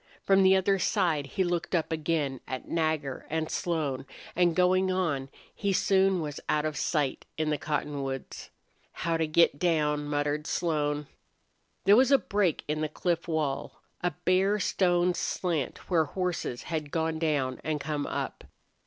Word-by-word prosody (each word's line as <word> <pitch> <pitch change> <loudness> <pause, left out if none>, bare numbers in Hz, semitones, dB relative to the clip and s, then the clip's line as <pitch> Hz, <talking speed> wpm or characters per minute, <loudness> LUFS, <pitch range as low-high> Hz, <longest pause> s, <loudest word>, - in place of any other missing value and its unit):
From 195 0 +4
the 190 0 +6
other 190 +1 +2
side 170 -9 +1
he 190 - 0
looked 175 0 -1
up 165 -2 0
again 155 -4 -1
at 130 -1 -5
Nagger 155 -5 -1
and 160 0 -2
Slone, 145 -6 -2 0.3
and, 175 -2 +3
going 185 +1 +3
on, 155 -8 -1 0.2
he 200 - -1
soon 190 -1 +3
was 150 -2 -4
out 150 0 +2
of 155 -1 -2
sight 150 -5 -1
in 155 -1 0
the 150 - +1
cottonwoods. 140 -3 -4 0.6
"How 165 -1 +2
to 165 -1 0
get 155 -2 +3
down!" 150 -4 +1
muttered 145 +1 -1
Slone. 150 -3 0 0.8
There 200 +2 +7
was 255 +2 +5
a 275 - +8
break 200 - 0
in 155 +1 -1
the 155 - -1
cliff 170 +2 -1
wall, 150 -4 -2 0.2
a 180 - +2 0.2
bare 190 +3 +3
stone 180 -2 +2
slant 170 -5 -2
where 165 -4 +3
horses 175 -6 -3
had 155 -3 -3
gone 160 0 -1
down 145 -5 0
and 155 -1 -1
come 145 0 -3
up. - - -4
160 Hz, 160 wpm, -28 LUFS, 150-180 Hz, 0.8 s, a